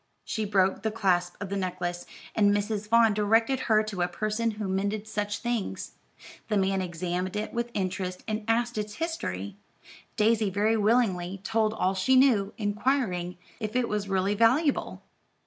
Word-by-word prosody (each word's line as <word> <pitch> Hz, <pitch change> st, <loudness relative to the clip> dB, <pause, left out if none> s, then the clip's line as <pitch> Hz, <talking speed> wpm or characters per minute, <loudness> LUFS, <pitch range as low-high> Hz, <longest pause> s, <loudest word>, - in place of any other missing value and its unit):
She 220 Hz, -, -2 dB
broke 190 Hz, -2 st, +2 dB
the 220 Hz, -, 0 dB
clasp 180 Hz, -5 st, +1 dB
of 200 Hz, -, -5 dB
the 200 Hz, -, -2 dB
necklace, 175 Hz, -2 st, -3 dB, 0.3 s
and 205 Hz, -2 st, +4 dB
Mrs. 205 Hz, +1 st, -1 dB
Vaughn 230 Hz, -1 st, +5 dB
directed 225 Hz, +5 st, +2 dB
her 215 Hz, -1 st, +5 dB
to 205 Hz, -4 st, -4 dB
a 175 Hz, -, +2 dB
person 215 Hz, +5 st, -1 dB
who 210 Hz, -2 st, -3 dB
mended 200 Hz, +3 st, -1 dB
such 205 Hz, -1 st, -2 dB
things. 240 Hz, -4 st, -3 dB, 0.6 s
The 210 Hz, -, +1 dB
man 195 Hz, 0 st, +1 dB
examined 180 Hz, +2 st, -3 dB
it 210 Hz, +1 st, -3 dB
with 235 Hz, 0 st, -2 dB
interest, 185 Hz, -1 st, -3 dB
and 215 Hz, 0 st, -2 dB
asked 235 Hz, 0 st, +1 dB
its 210 Hz, 0 st, -4 dB
history. 100 Hz, -, -4 dB, 0.6 s
Daisy 215 Hz, -1 st, +3 dB
very 210 Hz, +4 st, +2 dB
willingly 200 Hz, -5 st, +1 dB
told 220 Hz, 0 st, +1 dB
all 185 Hz, -2 st, +1 dB
she 195 Hz, +8 st, +2 dB
knew, 235 Hz, -7 st, +4 dB
inquiring 205 Hz, -5 st, -1 dB, 0.2 s
if 215 Hz, -1 st, -4 dB
it 250 Hz, -2 st, +2 dB
was 210 Hz, -1 st, -2 dB
really 195 Hz, +1 st, +1 dB
valuable. 255 Hz, +8 st, +2 dB
210 Hz, 165 wpm, -27 LUFS, 190-225 Hz, 0.6 s, Vaughn